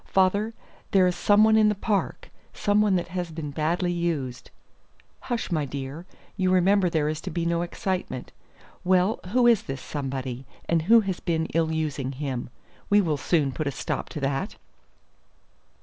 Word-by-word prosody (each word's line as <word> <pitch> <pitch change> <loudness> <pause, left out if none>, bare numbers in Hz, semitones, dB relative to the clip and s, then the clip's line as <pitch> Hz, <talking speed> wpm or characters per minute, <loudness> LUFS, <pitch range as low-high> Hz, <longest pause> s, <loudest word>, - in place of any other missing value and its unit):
Father, 200 +4 +2 0.3
there 190 -3 +4
is 180 -1 +1
some 205 +3 +4
one 220 0 +5
in 215 -1 +5
the 210 - 0
park 200 0 -2 0.2
some 205 +1 +2
one 205 -3 +3
that 175 -1 -1
has 180 -1 -3
been 155 -2 -6
badly 165 +4 0
used." 160 -8 -2 0.7
"Hush, 240 -6 -3
my 155 -3 +1
dear; 140 +5 -6 0.3
you 185 -2 +1
remember 185 +1 +4
there 155 -3 +1
is 155 0 -2
to - - -5
be 170 +1 -2
no 170 0 +1
excitement. 185 +2 -3 0.5
Well, 185 +3 +3
who 245 +6 +3
is 235 -4 +5
this 135 0 -6
somebody, 130 -3 -5 0.2
and 165 -1 +2
who 225 +8 +6
has 190 -4 -3
been 160 -2 -1
ill 160 -1 +1
using 150 -4 -2
him? 130 -3 -4 0.4
We 205 - +6
will 165 -7 +1
soon 145 -2 +1
put 155 +3 -3
a - - 0
stop - - -4
to - - -6
that." 135 +8 -2
170 Hz, 175 wpm, -26 LUFS, 150-195 Hz, 0.7 s, who